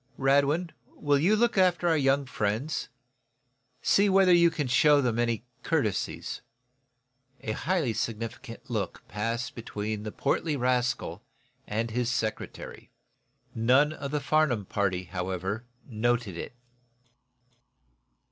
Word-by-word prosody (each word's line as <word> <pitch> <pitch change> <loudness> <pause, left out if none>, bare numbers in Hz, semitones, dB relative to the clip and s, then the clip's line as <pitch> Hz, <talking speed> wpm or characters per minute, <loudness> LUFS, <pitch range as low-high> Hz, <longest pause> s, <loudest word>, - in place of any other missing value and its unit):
Radwin, 140 +5 +2 0.2
will 145 -1 +2
you 185 +9 +4
look 235 -2 +2
after 180 -2 +3
our 165 - +4
young 140 -1 +2
friends? 115 +5 -2 0.9
See 200 +1 +4
whether 190 -1 +5
you 170 -1 +6
can 150 -3 -2
show 145 +4 +5
them 120 -4 0
any 115 -1 0 0.2
courtesies." 110 - -1 1.0
A 120 -5 -3
highly 155 -1 0
significant 115 +3 -5
look 110 -7 -4
passed 115 +4 -3
between 110 -2 -4
the 105 0 -5
portly 145 +4 -1
rascal 125 -7 0 0.5
and 115 +2 -2
his 120 +1 0
secretary. 110 -3 -4 0.6
None 130 +7 +3
of 140 -3 -6
the 150 +1 -1
Farnum 140 -7 +1
party, 95 -2 -1
however, 95 +5 -4 0.2
noted 120 -4 0
it. 85 - -7
125 Hz, 120 wpm, -28 LUFS, 110-150 Hz, 1.0 s, you